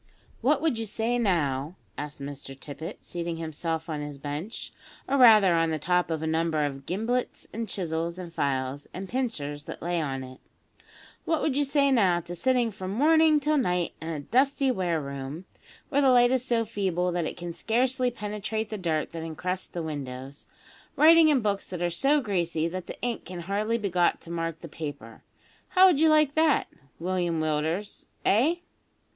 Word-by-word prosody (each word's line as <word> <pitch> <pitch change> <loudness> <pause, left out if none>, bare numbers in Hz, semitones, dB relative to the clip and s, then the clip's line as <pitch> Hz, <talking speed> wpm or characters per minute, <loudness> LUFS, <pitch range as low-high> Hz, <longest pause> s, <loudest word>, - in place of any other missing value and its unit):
"What 280 +4 +2
would 305 -9 +1
you 225 - -3
say 230 +4 -1
now," 155 - 0 0.2
asked 145 0 -6
Mr 140 -1 -8
Tippet, 150 +4 -8
seating 170 -1 -4
himself 160 0 -3
on 155 -2 -3
his 145 -1 -6
bench, 145 - -6 0.3
or 275 - +1
rather 215 -8 +7
on 165 -1 +2
the 160 - -1
top 180 +4 +1
of 160 -1 -2
a - - -1
number 160 -1 +1
of 135 -1 -6
gimblets 225 +8 -2
and 225 0 -4
chisels 170 -2 -2
and 175 -2 -8
files 135 -1 -2
and 190 +1 -5
pincers 160 - -3
that - - -7
lay 175 0 0
on 135 -3 -3
it; 130 0 -11 0.9
"what 325 -1 +1
would 285 - +1
you 290 - +3
say 280 0 +2
now 190 -9 +4
to 175 +1 -7
sitting 245 +4 +1
from 190 -2 -6
morning 310 +7 +4
till 300 +1 +2
night 180 -7 0
in 160 - -6
a 155 -3 -3
dusty 270 - +2
ware 180 -7 0
room, 140 +4 -6 0.4
where 285 0 +2
the 270 - +5
light 245 -1 +6
is 260 -1 +1
so 235 -3 +1
feeble 185 -5 -1
that 175 -2 -1
it - - -6
can 175 -1 -5
scarcely 250 +7 +1
penetrate 210 0 -4
the 215 - -4
dirt 160 -4 -1
that 165 -1 -6
encrusts 180 +3 -3
the 170 - -5
windows, 135 -2 -6 0.5
writing 320 +1 +7
in 280 -4 +3
books 205 -2 -1
that 180 -2 -4
are 175 - +1
so 275 - +3
greasy 170 - 0
that 180 +1 -5
the - - -8
ink 240 -2 -2
can 180 -1 -7
hardly 210 +5 0
be 210 -3 -2
got 175 -2 +2
to 170 - -10
mark 165 -1 -3
the 170 - -7
paper? 145 -8 -7 0.5
How 370 +1 +6
would 355 -7 +5
you 320 0 +5
like 305 -2 +4
that, 315 -2 +3 0.3
William 175 -1 -1
Willders 155 +6 -2 0.2
eh?" 265 - +4
180 Hz, 190 wpm, -27 LUFS, 160-240 Hz, 0.9 s, rather